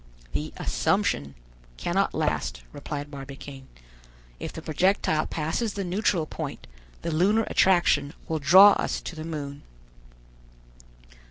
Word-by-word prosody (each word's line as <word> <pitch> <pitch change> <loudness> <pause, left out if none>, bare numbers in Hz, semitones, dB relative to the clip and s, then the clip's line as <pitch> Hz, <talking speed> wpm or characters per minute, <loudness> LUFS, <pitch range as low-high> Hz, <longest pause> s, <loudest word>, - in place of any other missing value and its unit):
"The 75 +3 -3
'Assumption' 70 -1 0 0.4
cannot 60 - 0
last," - - -1
replied 145 - -6
Barbicane. 135 -1 -9 0.7
"If - - -5
the - - -9
projectile 160 -1 +1
passes 165 +8 -2
the 200 - -2
neutral 180 -2 0
point, - - -6 0.4
the 170 - -2
lunar 200 +8 +3
attraction 175 -8 +3
will 160 -1 -1
draw 185 +8 +8
us - - -1
to 175 - -7
the 155 - -6
moon." 145 -3 -6
155 Hz, 115 wpm, -26 LUFS, 140-185 Hz, 0.7 s, draw